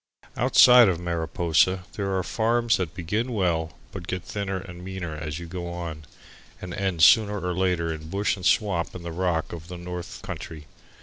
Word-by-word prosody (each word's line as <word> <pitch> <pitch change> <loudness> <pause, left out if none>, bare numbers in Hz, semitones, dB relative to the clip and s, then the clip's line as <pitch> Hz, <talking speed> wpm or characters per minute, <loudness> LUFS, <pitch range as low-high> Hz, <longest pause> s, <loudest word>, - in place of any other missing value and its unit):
Outside 125 -2 +7
of 85 -3 -1
Mariposa 85 +1 +1
there 100 -2 -2
are 95 - 0
farms 115 +3 +1
that 90 -3 -4
begin 105 +8 -2
well 85 -6 -1
but 90 -3 -8
get 90 -1 -3
thinner 100 0 -3
and 90 -1 -9
meaner 90 -4 -5
as 75 -1 -5
you 85 - -7
go 85 0 -6
on, 85 -3 -6 0.5
and 90 -1 -7
end 95 -4 0
sooner 105 +2 +6
or 90 0 -2
later 90 -3 0
in 80 0 -9
bush 100 +4 0
and 95 - -11
swamp 90 -6 +1
and 85 -1 -8
the 85 - -4
rock 85 -2 -1
of 80 -1 -8
the 90 -1 -7
north 90 0 -7
country. 75 -2 -7
90 Hz, 185 wpm, -25 LUFS, 85-95 Hz, 0.5 s, Outside